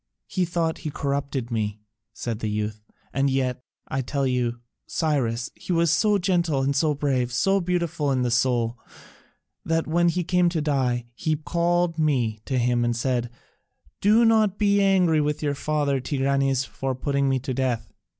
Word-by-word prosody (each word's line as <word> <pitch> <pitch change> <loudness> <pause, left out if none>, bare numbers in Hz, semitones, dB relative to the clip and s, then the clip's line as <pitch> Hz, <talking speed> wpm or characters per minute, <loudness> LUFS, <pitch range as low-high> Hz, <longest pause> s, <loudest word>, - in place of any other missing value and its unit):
"He 185 -2 -1
thought 165 -1 -1
he 155 - -4
corrupted 140 -3 -3
me," 105 -2 -2 0.3
said 115 -1 -4
the 110 - -2
youth; 105 0 -3 0.3
"and 140 +1 +2
yet, 130 -2 -1 0.3
I 135 - -1
tell 140 +2 -1
you, 125 -2 0 0.3
Cyrus, 125 -7 -1
he - - -7
was 170 -1 +3
so 205 +6 +3
gentle 175 -7 +1
and 140 +1 0
so 150 +1 +2
brave, 130 -4 0
so 195 +11 +2
beautiful 170 -5 -1
in 125 -2 +1
soul, 120 0 +1 0.8
that 165 0 0
when 170 +2 +2
he 180 +1 -1
came 180 0 +2
to 170 -2 -1
die, 130 -5 0
he 155 +5 -1
called 170 +2 0
me 125 -8 +1
to 130 - -1
him 120 0 +2
and 120 0 0
said, 120 -1 -1 0.7
'Do 220 +4 +5
not 215 -3 +3
be 200 -1 +3
angry 180 -5 +3
with 150 +1 -1
your 145 -1 +1
father, 145 -1 0
Tigranes, 135 0 +1
for 135 0 -4
putting 140 +1 0
me 135 - +2
to 130 +1 -4
death. 125 -3 -2
140 Hz, 170 wpm, -24 LUFS, 125-170 Hz, 0.8 s, Do